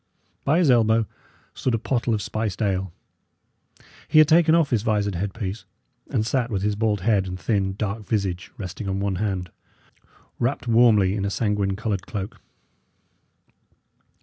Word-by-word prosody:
By 145 +4 +3
his 170 -7 +4
elbow 115 -2 +3 0.5
stood 125 -3 -1
a - - +1
pottle 120 0 0
of 105 - -3
spiced 110 0 -2
ale. 95 -2 -1 1.2
He 155 - +2
had 155 -1 +8
taken 165 0 +5
off 165 -4 +2
his 115 -4 +2
visored 105 -2 0
headpiece, 100 +2 -4 0.5
and 115 -6 0
sat 120 +1 0
with 100 -4 -2
his 105 0 +1
bald 105 -2 0
head 100 -1 +2
and 90 0 -6
thin, 95 -3 0
dark 105 0 -4
visage 95 -5 -2
resting 95 +1 -5
on 95 0 -1
one 100 -2 -1
hand, 95 -3 -2 0.9
wrapped 120 +1 -1
warmly 110 -5 +4
in 100 - -2
a 100 - 0
sanguine 100 -2 0
coloured 105 -2 -3
cloak. 100 -2 -6
105 Hz, 155 wpm, -24 LUFS, 95-115 Hz, 1.2 s, had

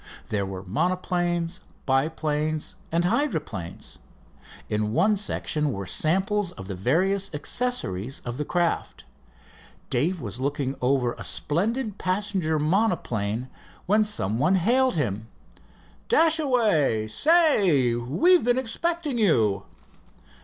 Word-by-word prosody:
There 100 -2 -1
were 95 -1 -6
monoplanes, 175 - -1 0.3
biplanes, 150 +2 -1 0.2
and 170 +1 +1
hydroplanes. 155 - -3 0.7
In 105 0 -1
one 200 +6 +3
section 155 -7 -1
were 100 -4 -5
samples 190 - +1
of 95 - -10
the 100 - -4
various 180 - +1
accessories 140 - -1
of 120 0 -4
the - - 0
craft. 175 +2 -1 0.9
Dave 170 +9 0
was 120 -2 -6
looking 140 0 -2
over 125 -1 +1
a - - -6
splendid 210 - -2
passenger 185 -4 -1
monoplane 150 - 0 0.4
when 210 +3 +3
some 115 - -1
one 165 +7 +3
hailed 245 +6 +2
him. 110 -8 -2 0.8
"Dashaway 250 - +3
say, 195 - +3
we've 155 - +3
been 245 +1 +2
expecting 290 +2 -1
you." 110 - +2
165 Hz, 110 wpm, -25 LUFS, -, 0.9 s, one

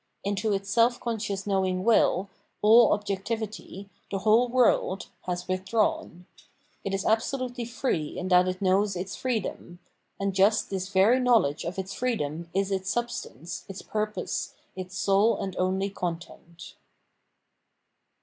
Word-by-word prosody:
Into 205 +2 -1
its 195 0 -1
self 235 +2 +3
conscious 215 -4 -3
knowing 190 -2 0
will, 205 -3 +3 0.4
all 225 +2 +7
objectivity, 205 -1 -3 0.2
the 195 - -2
whole 220 +5 +4
world, 240 -6 +2 0.2
has 180 0 -3
withdrawn. 190 - -1 0.6
It 195 - -3
is 195 - -3
absolutely 245 +2 0
jfree 230 - -2
in 185 - -4
that 180 0 +5
it 185 +1 -3
knows 195 +1 +2
its 185 +1 -4
freedom; 220 -7 -3 0.4
and 195 0 -1
just 200 +3 +3
this 190 -1 -3
very 200 +6 +4
knowledge 230 - +3
of 175 +2 -4
its 190 0 -4
freedom 170 -10 -2
is 195 +2 0
its 190 0 -1
substance, 175 - -4
its 195 - -7
pur|®ose, 215 0 -3 0.2
its 185 0 -7
sole 200 +3 +3
and 190 -1 -4
only 190 +2 0
content. 170 -1 -7
195 Hz, 135 wpm, -27 LUFS, 185-225 Hz, 0.6 s, all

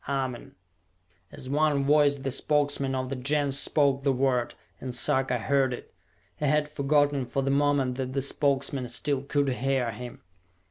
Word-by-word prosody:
"Amen!" 130 -3 -3 0.8
As 130 - -10
one 145 0 +1
voice, 145 0 +4
the 135 -1 -4
Spokesmen 140 -1 0
of 130 0 -3
the 135 - -3
Gens 140 +1 +1
spoke 140 -2 +2
the 140 0 +2
word, 130 -2 0 0.2
and 130 -2 -5
Sarka 130 0 +2
heard 130 +2 +1
it. - - -14 0.4
He - - -2
had 150 +1 +2
forgotten 145 -1 +1
for 125 +2 -2
the 135 - 0
moment 140 -3 +1
that 130 0 -3
the 135 -1 -1
Spokesmen 140 -2 0
still 140 +2 -2
could 140 0 0
hear 130 -1 -1
him. 120 +3 -9
135 Hz, 165 wpm, -27 LUFS, 130-145 Hz, 0.8 s, voice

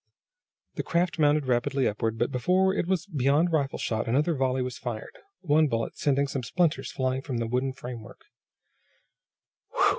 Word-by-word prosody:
The - - 0
craft 170 0 0
mounted 150 -1 +3
rapidly 130 +2 +1
upward, 110 +2 -1
but - - 0
before 185 +9 +2
it 185 - -1
was 185 -2 0
beyond 150 0 +2
rifle 140 -4 0
shot 110 0 -2
another 145 +8 +2
volley 130 -2 0
was 125 -1 -5
fired, 115 -3 -6 0.3
one 155 -2 +3
bullet 115 -4 -2
sending 140 -1 +1
some 135 -1 -3
splinters 165 +7 0
flying 130 -1 -1
from 135 -3 -4
the 115 - -1
wooden 125 +3 0
framework. 125 -3 -9
135 Hz, 155 wpm, -27 LUFS, 125-155 Hz, 0.3 s, mounted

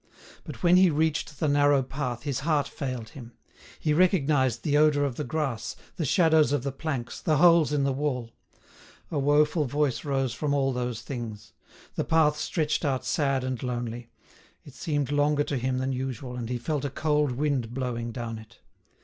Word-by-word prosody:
But - - -9
when 175 +1 +6
he 185 -1 +6
reached 155 -1 -1
the 155 - +1
narrow 145 -1 +4
path 125 -3 -4
his 140 -4 -2
heart 145 -2 +1
failed 130 -5 -5
him. 120 -1 -11 0.5
He 150 - +1
recognised 145 - +2
the 145 - +1
odour 150 -1 +4
of 135 - -2
the 150 - -3
grass, 135 -4 -3 0.2
the 160 - -2
shadows 160 -1 +4
of 145 -4 0
the 140 - -2
planks, 135 -3 -4
the 155 -2 +2
holes 170 -2 +5
in 145 -2 +1
the 135 -1 +1
wall. 130 -4 -2 0.8
A 150 - 0
woeful 150 +2 +3
voice 145 0 0
rose 135 -4 -1
from 145 +3 -1
all 135 -1 +1
those 125 -2 -3
things. 110 -8 -7 0.4
The - - -1
path 155 -2 +3
stretched 155 -1 -1
out 130 -3 -1
sad 135 +1 0
and 130 -2 -3
lonely; 120 -1 -4 0.5
it 145 - -13
seemed 145 -1 -2
longer 145 0 +2
to 145 - -2
him 130 +1 -1
than 130 +1 -1
usual, 130 -1 -4
and 120 -2 -5
he 125 - -1
felt 145 +4 -2
a 140 - -1
cold 150 -1 0
wind 135 -4 -1
blowing 120 -2 -3
down 115 -2 -5
it. 110 0 -16
140 Hz, 185 wpm, -27 LUFS, 125-150 Hz, 0.8 s, when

